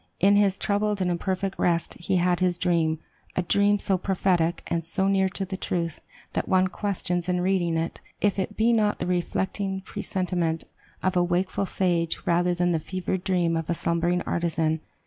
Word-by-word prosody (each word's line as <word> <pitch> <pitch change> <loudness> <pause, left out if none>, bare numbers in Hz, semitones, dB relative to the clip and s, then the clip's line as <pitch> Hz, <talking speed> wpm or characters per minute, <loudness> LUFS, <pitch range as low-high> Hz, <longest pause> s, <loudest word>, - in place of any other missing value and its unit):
In 200 +2 +5
his 200 -2 +3
troubled 205 0 0
and 180 -1 +1
imperfect 190 +2 -2
rest 170 -1 +1
he 175 +2 -1
had 180 0 +2
his 180 -2 +1
dream, 165 -3 +1 0.4
a 180 - +1
dream 200 +3 +3
so 195 -2 0
prophetic, 180 -3 +1
and 170 0 -1
so 190 +4 -1
near 190 -1 +3
to 195 0 -4
the 190 0 -5
truth, 170 -4 -2 0.3
that - - -2
one 185 0 +4
questions, 180 -3 -2
in 180 0 +1
reading 180 -3 +1
it, 165 +1 -3 0.2
if 205 -1 +1
it 200 +2 -3
be 230 +2 +4
not 210 -2 +2
the - - -3
reflecting 190 +2 -1
presentiment 175 -4 -2 0.4
of 185 0 +1
a 175 - +4
wakeful 185 +2 0
sage 170 -4 0
rather 175 +1 +2
than 175 0 +1
the 165 - +1
fevered 185 +2 -3
dream 175 -4 +1
of 165 0 -3
a 170 - +1
slumbering 170 +2 +1
artisan. 165 -2 0
180 Hz, 185 wpm, -26 LUFS, 170-195 Hz, 0.4 s, In